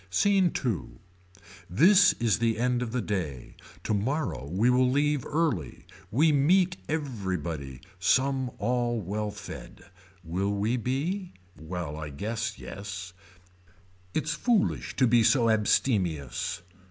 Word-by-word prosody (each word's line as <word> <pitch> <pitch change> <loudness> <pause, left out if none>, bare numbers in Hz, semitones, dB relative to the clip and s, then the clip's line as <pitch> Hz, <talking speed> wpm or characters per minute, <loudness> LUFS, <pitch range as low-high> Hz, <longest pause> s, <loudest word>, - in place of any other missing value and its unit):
SCENE 190 - +3
II. 95 - -3 0.7
This 180 - +6
is 115 -2 +1
the 115 -1 +1
end 125 +1 +1
of 120 -2 -3
the 125 -2 -1
day. 80 - -4 0.3
Tomorrow 110 - -1
we 100 +7 +2
will 125 0 +3
leave 145 0 +1
early. 145 - -1 0.2
We 150 +9 +3
meet 175 +6 +3
everybody. 90 - -3 0.2
Some 130 -1 +2
all 120 -1 0
well 105 +2 -3
fed. 95 -2 -10 0.3
Will 95 +4 -1
we 105 +4 0
be. 150 - -2 0.2
Well 80 -2 -5
I 75 -1 -5
guess 110 +8 -3
yes. 90 -3 -7 1.0
It's 155 0 0
foolish 230 +7 0
to 130 - +3
be 120 -1 +4
so 115 -1 +4
abstemious. 95 - 0
115 Hz, 120 wpm, -28 LUFS, 95-140 Hz, 1.0 s, This